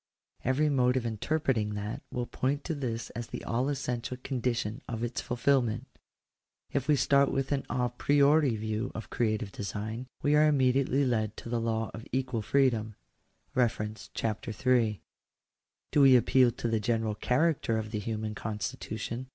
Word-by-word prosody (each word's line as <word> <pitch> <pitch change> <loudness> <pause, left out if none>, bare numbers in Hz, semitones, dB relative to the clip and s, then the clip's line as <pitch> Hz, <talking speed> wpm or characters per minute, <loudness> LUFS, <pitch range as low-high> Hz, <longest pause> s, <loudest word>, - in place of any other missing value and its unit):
Every 135 +4 +2
mode 130 -3 +3
of 125 - -1
interpreting 115 -2 0
that 105 +1 -4
will 125 -1 -2
points 135 +4 -1
to 165 - -2
this 120 -6 -4
as 120 0 -5
the - - -7
all 125 +4 0
essential 125 -3 -3
condition 120 -4 -2
of 115 -1 -4
its 120 0 -2
fulfilment. 120 -2 +1
♦ - - -21 0.8
If 140 -1 -1
we 150 - +5
start 140 0 +3
with 135 +1 -1
an 140 -1 -1
a 125 -1 +1
priori 140 +2 +3
view 110 +3 -2
of 115 - -7
creative 110 -3 0
design, 110 +5 -5 0.2
we 145 - +3
are 155 +1 +6
immediately 135 -1 +3
led 110 -4 0
to - - -8
the 120 -1 0
law 115 -1 -1
of 110 - -8
equal 130 -3 -1
freedom 110 -2 +1 1.2
(Chap. 110 -2 -2
III). 115 -2 +1 0.9
Do 145 - +4
we 135 -2 +8
appeal 125 +1 +5
to 120 - -4
the 115 -1 +1
general 110 0 0
character 125 0 +1
of 110 -1 -4
the 105 - -2
human 110 0 -3
constitution 110 +3 -4
120 Hz, 160 wpm, -30 LUFS, 110-135 Hz, 1.2 s, we